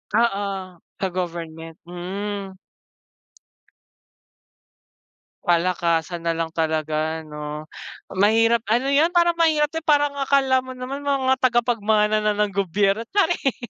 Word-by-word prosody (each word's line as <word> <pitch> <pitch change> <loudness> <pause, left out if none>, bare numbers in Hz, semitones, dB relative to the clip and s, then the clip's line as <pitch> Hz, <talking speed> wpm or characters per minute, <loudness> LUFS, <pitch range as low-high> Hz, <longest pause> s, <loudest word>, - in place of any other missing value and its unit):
Oo, 195 -5 -1 0.2
sa 190 - 0
government, 165 -2 -5
mm. 190 +3 -5 2.9
Palakasan 170 -1 0
na 165 - +2
lang 165 0 -2
talaga 160 0 -1
ano. 150 0 -7 0.4
Mahirap 225 +4 +3
ano 245 +5 +1
yun 295 +4 +4
parang 345 -1 +3
mahirap 310 -3 +3
din, 325 0 -5
parang 290 -1 +2
akala 270 -1 +3
mo 260 - -7
naman 265 +3 -6
mga 265 -2 +2
tagapagmana 220 -4 +2
na 210 - +2
ng 210 -1 0
gobyerno. 200 +3 +1
Charing. 350 - +1
205 Hz, 110 wpm, -22 LUFS, 170-260 Hz, 2.9 s, yun